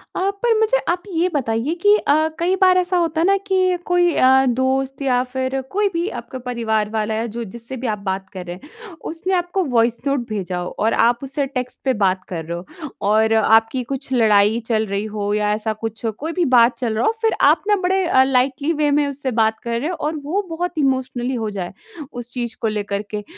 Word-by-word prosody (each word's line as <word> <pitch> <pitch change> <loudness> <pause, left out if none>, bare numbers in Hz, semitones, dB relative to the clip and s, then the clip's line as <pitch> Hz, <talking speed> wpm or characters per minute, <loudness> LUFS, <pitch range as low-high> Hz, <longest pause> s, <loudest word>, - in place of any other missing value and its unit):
अ, 380 +2 +1
पर 465 -2 +3
मुझे 440 +3 +3
आप 350 +1 0
ये 340 +2 +2
बताइए 250 +1 0
कि 410 +2 +6
अ, 285 - +1 0.3
कई 355 +3 +2
बार 370 -1 +6
ऐसा 360 0 +1
होता 325 -2 0
है - - +3
ना 395 - +5
कि 370 -1 +2
कोई 355 -1 +3
अ, 265 +1 +5
दोस्त 265 +2 0
या 255 -2 +2
फिर 260 +1 -3
कोई 415 +1 +2
भी 340 +2 -1
आपका 260 - -9
परिवार 220 -4 -1
वाला 220 0 -1
या 225 +1 -1
जो 235 - -3
जिससे 235 +5 -8
भी 250 0 -4
आप 210 -2 -2
बात 190 0 -3
कर 185 -2 -7
रहे 175 0 -6
हैं 445 +6 -13 0.2
उसने 350 +3 -3
आपको 355 +1 0
वॉइस 230 0 +2
नोट 275 0 +1
भेजा 190 -4 -3
हो 180 0 -3
और 220 +2 +2
आप 235 +1 +3
उससे 275 +1 -2
टेक्स्ट 255 -2 -5
पे 260 - +3
बात 185 -1 +1
कर 165 -3 -4
रहे 170 +1 -4
हो 275 - -9 0.2
और 220 +1 +3
आपकी 225 +3 +3
कुछ 265 +2 -6
लड़ाई 215 -2 +4
चल 220 -2 +1
रही 200 +1 -2
हो 205 -1 -1
या 210 0 +1
ऐसा 215 +1 -2
कुछ 225 +1 -6
हो 225 - +1
कोई 300 +10 -5
भी 355 -1 +1
बात 235 +1 +5
चल 240 -3 -2
रहा - - +1
हो। - - +4
फिर 445 -1 +2 0.2
आप - - +3
ना 415 - +4
बड़े 380 0 +1
अ, 260 -5 +5
लाइटली 270 +3 +1
वे 300 -1 +1
में 290 0 +3
उससे 280 -1 -3
बात 220 0 +1
कर 235 -1 -2
रहे 295 +7 -2
हो 360 - -3
और 310 +2 -1
वो 355 +8 -1
बहुत 345 +1 -3
इमोशनली 260 -3 0
हो 220 -2 -2
जाए, 195 -3 -5 0.4
उस 245 0 -8
चीज़ 240 -2 -4
को 225 - +1
लेकर 205 -2 -2
के। 210 -1 -4
255 Hz, 230 wpm, -20 LUFS, 220-325 Hz, 0.4 s, कि